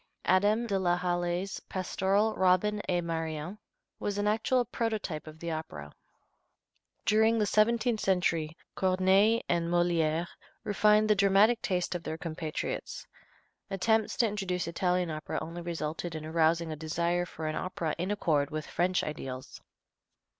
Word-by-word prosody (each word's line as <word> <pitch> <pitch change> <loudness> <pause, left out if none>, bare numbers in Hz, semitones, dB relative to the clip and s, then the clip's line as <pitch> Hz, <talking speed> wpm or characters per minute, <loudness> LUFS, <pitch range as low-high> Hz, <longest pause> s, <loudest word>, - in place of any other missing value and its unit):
Adam 205 +5 +3
de 200 -4 0
la 175 -1 +2
Hallé's 175 +1 -1
pastoral, 195 +3 +1
"Robin 190 +3 +2
et 175 -1 +2
Marion," 165 +2 -4 0.4
was 205 -1 -2
an 205 - 0
actual 235 +4 +2
prototype 215 -10 -3
of 155 0 -10
the 170 +1 -4
opera. 75 - -6 1.1
During 220 +1 +4
the 215 - +2
seventeenth 225 +2 +2
century 170 -5 0 0.2
Corneille 190 +4 +3
and 170 -1 0
Molière 170 -2 +2 0.4
refined 210 0 +3
the 215 - +5
dramatic 200 +4 +4
taste 180 -1 -1
of 175 - -3
their 160 -1 -5
compatriots. 160 -2 -4 0.6
Attempts 220 +3 +1
to 235 - +4
introduce 190 -5 -2
Italian 180 0 0
opera 155 0 -4
only 170 +2 -6
resulted 165 0 -4
in 155 -1 -5
arousing 165 +1 +1
a - - -3
desire 170 +3 -1
for 160 - -7
an 155 0 -2
opera 170 -4 -2
in 180 +3 -1
accord 155 -8 +1
with 155 -1 -4
French 180 +1 0
ideals. 130 -4 -6
180 Hz, 140 wpm, -30 LUFS, 160-205 Hz, 1.1 s, the